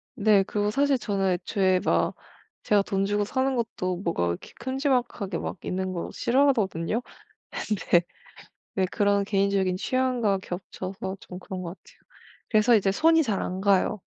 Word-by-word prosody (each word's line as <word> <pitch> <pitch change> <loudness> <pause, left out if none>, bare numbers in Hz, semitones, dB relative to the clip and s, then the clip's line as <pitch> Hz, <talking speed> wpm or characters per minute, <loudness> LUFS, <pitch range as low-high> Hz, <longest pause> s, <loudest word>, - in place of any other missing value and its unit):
네, 210 -4 +4
그리고 205 +1 -1
사실 280 +3 +2
저는 195 -5 0
애초에 185 +1 +1
막 - - +1 0.5
제가 205 -1 +3
돈 195 0 0
주고 205 +1 +1
사는 260 +5 0
것도 185 -6 -2
뭐가 170 - -1
이렇게 85 0 -4
큼지막하게 250 - -1
막 - - -5
있는 185 0 -2
거 170 - -4
싫어하거든요. 230 - +1 0.5
근데 190 -4 +1 0.7
네 190 - +1
그런 200 -1 +2
개인적인 195 -2 +1
취향과 245 -3 +1
겹쳐서 190 +1 -6
좀 180 - -9
그런 185 0 -6
것 170 - -5
같아요. 475 - -15 0.5
그래서 225 +1 +5
이제 195 -2 +2
손이 325 +7 +4
잘 215 -9 -1
안 185 +1 -3
가요. 200 +1 +2
200 Hz, 315 characters per minute, -26 LUFS, 190-235 Hz, 0.7 s, 그래서